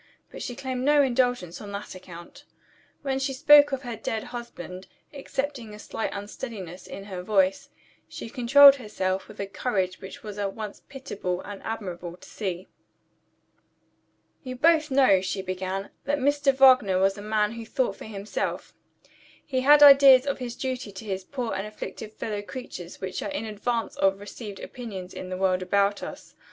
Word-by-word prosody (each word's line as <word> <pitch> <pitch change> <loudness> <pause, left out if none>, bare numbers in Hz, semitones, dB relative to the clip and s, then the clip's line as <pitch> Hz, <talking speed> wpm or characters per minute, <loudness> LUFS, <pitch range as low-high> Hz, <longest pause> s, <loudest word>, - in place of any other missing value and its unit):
But - - -9
she 245 - -5
claimed 260 -1 -4
no 290 +1 +5
indulgence 245 -9 0
on 205 -1 -8
that 200 +1 -6
account. 185 +9 -12 0.6
When 270 -1 -1
she 270 0 -1
spoke 295 +1 +7
of 270 0 -3
her 240 -2 -5
dead 220 0 -3
husband 215 -7 -8 0.3
excepting 270 -5 -4
a - - -11
slight 220 - -4
unsteadiness 200 -3 -7
in 195 - -8
her 190 -3 -6
voice 190 -1 +1 0.4
she - - -7
controlled 275 +3 +7
herself 190 -5 -3
with 215 - -14
a 200 - -2
courage 195 -3 -2
which 190 0 -10
was 210 -1 -7
at 200 -1 -2
once 215 -2 -7
pitiable 195 -10 -4
and 205 -1 -9
admirable 180 -6 -6
to - - -15
see. 185 -3 -5 1.7
"You 255 -1 -6
both 310 +2 +3
know," 260 -9 +5
she 190 +1 -3
began, 185 +1 -4
"that 290 +1 +1
Mr. 285 +1 +2
Wagner 255 -8 +5
was 195 +1 +2
a 205 - -8
man 210 0 +1
who 230 0 -7
thought 225 -2 -1
for - - -10
himself. 205 -1 -4 0.7
He 260 -3 -1
had 295 +2 +7
ideas 275 -2 +9
of 280 -1 -2
his 245 -2 -5
duty 255 -5 -4
to 195 +3 -10
his 190 -2 -3
poor 245 +2 -4
and 195 +2 -3
afflicted 215 0 -8
fellow 210 -1 -4
creatures 205 -6 -8
which 190 -1 -4
are - - -3
in 290 -6 -4
advance 225 +2 -2
of 195 0 +2
received 205 0 -8
opinions 195 -7 -7
in 185 - -7
the 185 - -4
world 185 -1 +1
about 200 +2 +1
us. - - -9
215 Hz, 175 wpm, -26 LUFS, 195-260 Hz, 1.7 s, ideas